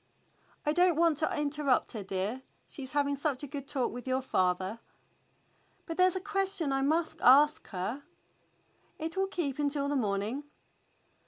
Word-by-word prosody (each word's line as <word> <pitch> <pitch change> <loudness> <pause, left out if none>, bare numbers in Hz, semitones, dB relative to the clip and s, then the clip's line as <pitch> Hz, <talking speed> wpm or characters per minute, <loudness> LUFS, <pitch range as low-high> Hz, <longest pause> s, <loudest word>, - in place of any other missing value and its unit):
^" - - -30
"I 300 - +2
don't 355 0 +4
want 325 -2 +3
to 310 - 0
interrupt 290 -3 +1
her, 220 - -5
dear. 195 +6 -3 0.3
She's 270 -2 -8
having 285 -1 +1
such 280 -1 -2
a - - -4
good 280 0 -6
talk 265 -4 0
with 245 +2 -8
your 260 0 0
father." 185 -1 0 1.1
"But 330 -2 -5
there's 370 0 +4
a - - 0
question 390 -6 -1
I 270 - +1
must 315 +3 0
ask 295 +4 +6
her." 200 +8 -4 1.0
"It 320 +1 -4
will 385 0 +1
keep 310 -8 -3
until 285 -1 0
the 290 - 0
morning." 215 +3 -1
285 Hz, 165 wpm, -30 LUFS, 255-320 Hz, 1.1 s, ask